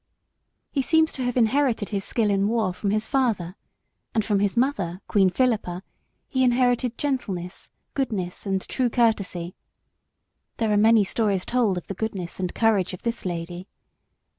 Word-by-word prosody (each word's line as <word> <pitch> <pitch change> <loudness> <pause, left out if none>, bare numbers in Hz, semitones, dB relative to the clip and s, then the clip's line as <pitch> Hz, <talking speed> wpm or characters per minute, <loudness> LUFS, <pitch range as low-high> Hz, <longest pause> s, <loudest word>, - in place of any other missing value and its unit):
He 275 - +1
seems 320 +3 +3
to 265 - -6
have 245 0 -1
inherited 240 -2 +2
his 200 -2 -2
skill 215 -1 +1
in 195 0 +2
war 215 -4 +1
from 200 +2 -2
his 215 +2 0
father, 220 -10 0 0.6
and 220 -2 +2
from 205 -2 +2
his 205 +2 0
mother, 200 -9 0
Queen 195 -2 +4
Philippa, 205 -5 0 0.4
he 260 -1 +1
inherited 245 -1 +2
gentleness, 195 -11 -3 0.2
goodness, 205 -9 -2
and 195 -1 -1
true 255 -2 0
courtesy. 200 -7 0 1.0
There 225 -2 +1
are - - +3
many 220 +1 +5
stories 200 -2 0
told 235 -7 +1
of 175 - -5
the - - -5
goodness 190 -4 -4
and 180 -1 -3
courage 210 -5 +2
of - - -17
this 235 -3 -3
lady. 175 +1 -4
215 Hz, 160 wpm, -24 LUFS, 185-245 Hz, 1.0 s, many